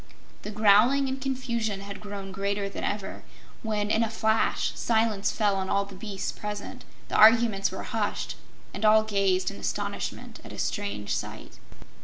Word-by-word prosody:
The - - -6
growling 215 +6 +5
and 265 0 -3
confusion 235 -6 -2
had 200 0 -8
grown 200 -2 -7
greater 200 +1 -1
than 195 - -6
ever 205 -1 -3 0.4
when 215 -2 -1
in 220 - +3
a 225 - 0
flash 220 0 +1
silence 220 -3 +1
fell 205 -3 +1
on 190 0 -2
all 200 0 +2
the 200 - -12
beasts 195 0 -4
present, 210 -1 -6 0.2
the - - -10
arguments 220 -2 +6
were 190 - -6
hushed, 215 -2 -2 0.4
and - - -5
all 215 0 +6
gazed 195 -3 +1
in - - -10
astonishment 100 - -4
at - - -10
a - - -9
strange 100 0 -2
sight. - - -7
210 Hz, 165 wpm, -27 LUFS, 195-220 Hz, 0.4 s, arguments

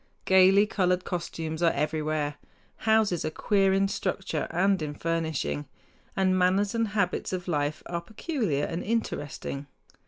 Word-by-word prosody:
Gaily 190 +2 +6
colored 180 -3 0
costumes 165 -2 -4
are 170 - +5
everywhere; 150 0 -1 0.5
houses 215 -6 +3
are 155 - -1
queer 195 +4 +2
in 195 +1 +3
structure 190 -5 -2
and 190 +2 +2
in 150 -1 -4
furnishing; 160 - -2 0.5
and 190 -1 +2
manners 185 +2 +2
and 230 -1 +1
habits 200 -3 -1
of 180 -1 -4
life 150 -2 -1
are 170 -1 -3
peculiar 215 - -2
and 170 +1 -4
interesting. 145 -10 -3
180 Hz, 135 wpm, -27 LUFS, 155-195 Hz, 0.5 s, Gaily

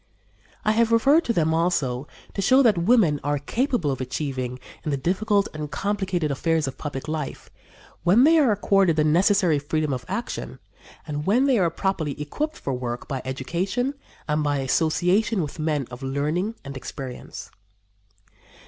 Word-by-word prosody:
I 215 - +4
have 230 +1 +2
referred 275 +8 +4
to - - +1
them, 160 -5 +2
also, 150 -6 0 0.3
to 195 - -2
show 260 +7 +5
what 225 -5 +5
women 170 -4 +3
are 145 +1 0
capable 210 - 0
of 130 - -3
achieving 130 -1 -3 0.2
in - - -3
the 140 - 0
difficult 200 +7 +1
and 150 -1 -5
complicated 190 -4 -1
affairs 160 +2 0
of 135 - -6
public 145 -2 -5
life, 155 -2 -5 0.5
when 195 +8 +5
they 320 +3 +6
are 270 -7 +4
accorded 195 -4 +3
the 155 - +3
necessary 175 0 +3
freedom 150 0 -1
of 125 -1 -4
action 240 +1 -4 0.5
and 150 0 -4
when 245 +7 +4
they 260 -5 +3
are 175 -3 +3
properly 165 -5 -2
equipped 300 - -3
for 135 - -3
work 125 -1 -4
by 135 -2 -3
education 175 - -2 0.3
and 150 0 +1
by 145 -1 +1
association 175 - +1
with 150 +2 -7
men 155 -3 0
of 125 +2 -9
learning 150 +10 -1
and 140 0 -7
experience. 130 -1 -8
160 Hz, 165 wpm, -24 LUFS, 145-205 Hz, 0.5 s, they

